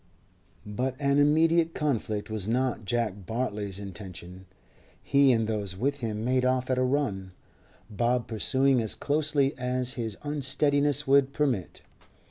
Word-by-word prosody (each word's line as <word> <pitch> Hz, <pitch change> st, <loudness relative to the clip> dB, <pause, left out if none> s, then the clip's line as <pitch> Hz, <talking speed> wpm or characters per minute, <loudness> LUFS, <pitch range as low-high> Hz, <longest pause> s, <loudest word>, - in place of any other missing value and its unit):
But 125 Hz, +5 st, -3 dB
an 140 Hz, 0 st, +2 dB
immediate 165 Hz, +3 st, +3 dB
conflict 110 Hz, -8 st, -2 dB
was 105 Hz, -3 st, -2 dB
not 120 Hz, -2 st, -1 dB
Jack 105 Hz, -4 st, -2 dB
Bartley's 105 Hz, -5 st, -3 dB
intention. 95 Hz, -2 st, -9 dB, 0.6 s
He 140 Hz, -1 st, +4 dB
and 115 Hz, -2 st, +2 dB
those 105 Hz, -4 st, -3 dB
with 140 Hz, +6 st, -1 dB
him 110 Hz, -2 st, -3 dB
made 130 Hz, 0 st, +1 dB
off 130 Hz, 0 st, 0 dB
at 130 Hz, -, +1 dB
a -, -, +2 dB
run, 115 Hz, -9 st, -1 dB, 0.5 s
Bob 120 Hz, +3 st, 0 dB
pursuing 130 Hz, +3 st, +2 dB
as 110 Hz, -, +1 dB
closely 145 Hz, -2 st, +1 dB
as 125 Hz, 0 st, -1 dB
his 115 Hz, -5 st, -4 dB
unsteadiness 145 Hz, 0 st, +1 dB
would 135 Hz, 0 st, +3 dB
permit. 135 Hz, -11 st, -2 dB
125 Hz, 135 wpm, -27 LUFS, 105-140 Hz, 0.6 s, He